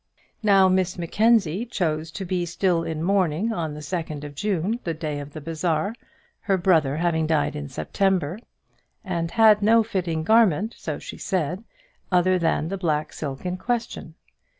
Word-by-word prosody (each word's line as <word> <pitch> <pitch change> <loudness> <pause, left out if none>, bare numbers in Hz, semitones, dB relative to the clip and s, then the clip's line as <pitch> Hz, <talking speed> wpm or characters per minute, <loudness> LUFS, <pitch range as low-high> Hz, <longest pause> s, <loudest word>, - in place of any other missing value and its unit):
Now 195 -3 +5
Miss 185 -1 +1
Mackenzie 200 +1 +2
chose 165 -9 -2
to 195 - -5
be 180 0 -1
still 175 0 +1
in 160 -1 -3
mourning 190 +2 +1
on 160 -6 -3
the 150 - -8
second 155 -2 -4
of 145 -1 -7
June, 200 +5 -1
the 165 -2 -2
day 155 -2 -4
of 145 0 -9
the 155 - -7
bazaar, 165 +4 -1 0.5
her 195 -2 +1
brother 160 -6 +2
having 160 -2 +1
died 155 -2 +1
in 70 -1 -5
September, 180 - -1 0.6
and 170 -4 -2
had 215 +1 +5
no 225 +2 +5
fitting 180 -7 -2
garment, 220 0 +3
so - - -5
she - - -9
said, 180 +1 -2 0.5
other 180 0 +3
than 165 -1 0
the 195 0 -4
black 155 -4 -1
silk 140 +1 -6
in 180 0 -2
question. 225 -7 -3
175 Hz, 165 wpm, -24 LUFS, 155-195 Hz, 0.6 s, Now